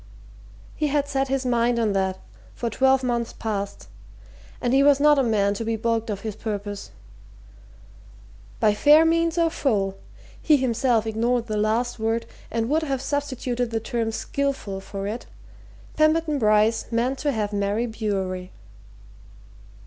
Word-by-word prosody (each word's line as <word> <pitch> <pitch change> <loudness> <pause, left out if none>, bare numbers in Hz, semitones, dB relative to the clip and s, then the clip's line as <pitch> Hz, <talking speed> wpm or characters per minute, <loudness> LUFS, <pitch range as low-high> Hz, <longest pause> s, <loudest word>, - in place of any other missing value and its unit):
He 305 - 0
had 285 0 0
set 270 -1 0
his 270 0 -1
mind 240 -1 +2
on 220 -3 +1
that 190 -1 0 0.4
for 235 -1 -3
twelve 265 0 +3
months 235 -2 -1
past, 200 -2 -4 0.7
and 245 0 0
he 270 - +5
was 285 0 +5
not 295 0 +5
a - - +4
man 205 -4 +2
to 205 - -4
be 225 0 -1
baulked 230 0 -1
of 200 -2 -3
his 215 -2 -5
purpose. 205 -2 -5 1.7
By 215 -2 +4
fair 300 +8 +6
means, 335 +1 +2
or 335 -1 +3
foul 200 -11 0 0.5
he 305 -2 +4
himself 245 -3 +1
ignored 230 +2 0
the 215 - -3
last 220 +3 0
word 225 +1 -1 0.2
and 225 0 -1
would 310 +5 +1
have 275 -4 -2
substituted 255 -4 -2
the 225 -1 -1
term 225 0 -2
skilful 270 -6 -3
for 195 0 -6
it 220 +4 -5 0.7
Pemberton 310 -1 +2
Bryce 215 0 +3
meant 245 +3 0
to 295 - 0
have 210 -4 -2
Mary 205 +3 0
Bewery. 195 -5 -3
235 Hz, 150 wpm, -24 LUFS, 215-270 Hz, 1.7 s, fair